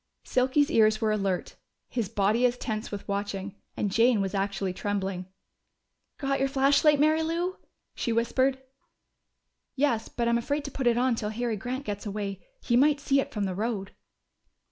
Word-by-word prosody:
Silky's 265 +4 +2
ears 215 -4 +4
were 220 -2 +1
alert, 195 -3 -1 0.3
his 230 -6 -2
body 210 +3 +1
as 245 0 -3
tense 220 -2 -4
with 205 -1 -6
watching, 200 -1 -3 0.2
and 205 - -1
Jane 230 +1 +4
was 195 -1 -1
actually 195 -1 -1
trembling. 190 -2 -3 0.9
"Got 275 -1 -1
your 270 - +2
flashlight, 280 +2 +4
Mary 310 +2 +4
Lou?" 340 +3 -1 0.4
she 235 - -2
whispered. 260 +4 +2 1.2
"Yes, 260 -5 +1
but 235 -1 -2
I'm 235 0 +3
afraid 285 +5 -2
to 280 - -5
put 265 -2 -1
it 235 -1 +4
on 255 0 +3
till 215 -2 -2
Harry 230 +1 -2
Grant 255 +6 -4
gets 205 +1 -4
away. 200 -2 -4 0.2
He 235 - +1
might 285 +3 +4
see 275 -1 +2
it - - -7
from 210 -3 -2
the 190 -2 -1
road." 205 -1 -3
230 Hz, 170 wpm, -27 LUFS, 205-270 Hz, 1.2 s, ears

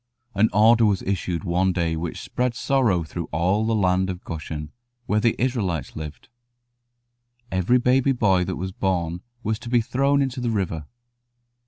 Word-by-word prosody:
An 110 +1 +3
order 110 +3 +5
was 100 -2 0
issued 90 -2 -2
one 90 +1 +1
day 85 -2 0
which 80 +1 -4
spread 125 -1 -2
sorrow 120 -10 +2
through 80 - -5
all 95 +7 +1
the 115 - +1
land 95 -2 +2
of 90 -1 -5
Goshen, 80 -2 -6 0.3
where 105 -1 +1
the 115 +1 +2
Israelites 105 - -1
lived. 75 -1 -8 1.2
Every 95 +7 +3
baby 125 +2 +3
boy 100 -8 +2
that - - -3
was 95 +2 -4
born 90 -3 -1 0.2
was 110 +1 -1
to 120 - -8
be 120 0 +4
thrown 140 +5 +1
into 130 -1 -3
the 120 - 0
river. 90 -8 -2
95 Hz, 165 wpm, -24 LUFS, 85-120 Hz, 1.2 s, order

